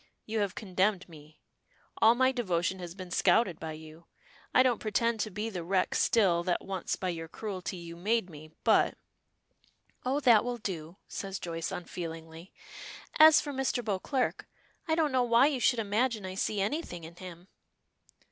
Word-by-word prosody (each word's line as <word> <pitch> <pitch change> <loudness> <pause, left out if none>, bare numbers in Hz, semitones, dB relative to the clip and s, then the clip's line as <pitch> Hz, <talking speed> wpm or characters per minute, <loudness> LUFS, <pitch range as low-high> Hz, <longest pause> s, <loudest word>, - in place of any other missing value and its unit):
You 220 0 -2
have 200 -3 -1
condemned 190 -1 0
me. 155 -2 -15 0.6
All 225 +2 +6
my 260 +1 +3
devotion 190 -6 -1
has 175 -1 -7
been 185 -2 -9
scouted 190 -1 +3
by 160 -1 -5
you. 155 +2 -12 0.4
I 255 - +6
don't 250 -3 +2
pretend 230 +1 0
to 215 - -1
be 210 +3 -4
the 180 -4 -5
wreck 185 +2 0
still 190 -7 +3
that 180 -2 -1
once 190 -2 -3
by 185 - -3
your 165 -2 -4
cruelty 190 0 -5
you 170 -1 -9
made 210 +4 0
me, 155 -2 -12
but - - +4 0.6
" - - -38
"Oh, 265 +3 0
that 235 -6 +6
will 245 0 -3
do," 175 -5 -6
says 195 -1 -5
Joyce, 165 -2 -4
unfeelingly. 165 0 -7 0.7
"As 315 0 +9
for 290 - -5
Mr. 260 -3 -1
Beauclerk, 225 +6 -1 0.4
I 320 - +2
don't 315 -3 +1
know 260 -1 +2
why 240 +1 +5
you 285 -3 +1
should 245 - +3
imagine 220 0 0
I 185 - -5
see 200 +2 -1
anything 195 - -3
in 165 +2 -11
him." 180 -1 -10
195 Hz, 175 wpm, -30 LUFS, 170-235 Hz, 0.7 s, As